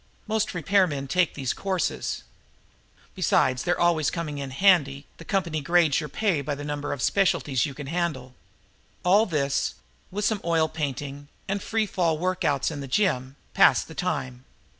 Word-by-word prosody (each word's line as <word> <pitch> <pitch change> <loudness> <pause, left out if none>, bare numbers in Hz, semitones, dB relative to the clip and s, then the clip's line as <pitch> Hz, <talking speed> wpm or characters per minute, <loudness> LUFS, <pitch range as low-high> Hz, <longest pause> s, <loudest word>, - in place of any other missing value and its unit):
Most 220 -1 0
repairmen 175 -6 +1
take 180 +4 +1
these 135 -4 -2
courses. 190 -3 -2 0.9
Besides 130 -1 +2
their 175 0 0
always 165 -6 +3
coming 150 0 -4
in 140 -1 -4
handy, 140 -3 +3
the - - -10
company 170 -5 -1
grades 170 -1 +3
your 150 -2 -5
pay 180 -1 0
by 145 +1 -3
the 145 - -7
number 145 0 -3
of 140 -3 -3
specialties 145 -10 +2
you 135 - -8
can 145 - -7
handle. 145 -5 -2 0.7
All 205 +5 +5
this, 140 -5 0 0.3
with 205 +2 -2
some 215 -2 0
oil 165 -2 +2
painting 145 -2 -5 0.2
and 195 0 -2
free 225 +2 0
fall 170 -5 0
workouts 165 -5 0
in 150 - -5
the 135 - -6
gym, 130 -5 0 0.2
passed - - +5
the - - -10
time. 65 -1 -3
155 Hz, 160 wpm, -25 LUFS, 140-185 Hz, 0.9 s, All